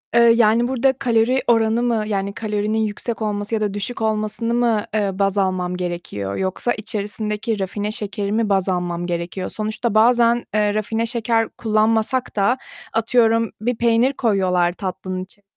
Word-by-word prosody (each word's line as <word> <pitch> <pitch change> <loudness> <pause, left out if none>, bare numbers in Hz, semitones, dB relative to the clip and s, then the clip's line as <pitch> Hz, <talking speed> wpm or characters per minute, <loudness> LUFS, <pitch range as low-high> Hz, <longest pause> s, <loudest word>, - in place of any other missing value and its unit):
eee, 235 - +6
yani 230 0 +5
burada 265 +1 +2
kalori 250 0 +1
oranı 225 0 +3
mı, 230 -3 +1
yani, 200 -1 -2
kalorinin 210 0 -2
yüksek 220 +2 -3
olması 210 0 -2
ya 215 - -2
da 205 -2 -1
düşük 205 +4 -4
olmasını 220 +1 -1
mı, 235 -3 +2
eee, 205 -2 +1
baz 195 +1 0
almam 185 -2 0
gerekiyor 170 - -4
yoksa 190 +5 -1
içerisindeki 210 +1 -3
rafine 205 +2 -3
şekeri 205 -1 -3
mi 220 0 +1
baz 195 -1 +1
almam 175 -1 -2
gerekiyor? 175 +2 -3
Sonuçta 220 +1 -2
bazen, 235 +1 +4
eee, 210 -1 +2
rafine 220 +2 -1
şeker 230 -1 0
kullanmasak 220 +3 +1
da 210 +5 +2 0.4
atıyorum 230 0 +2
bir 245 +2 0
peynir 235 +3 +3
koyuyorlar 185 -8 +1
tatlının 185 0 -4
içerisine 200 +2 -17
215 Hz, 155 wpm, -21 LUFS, 195-230 Hz, 0.4 s, eee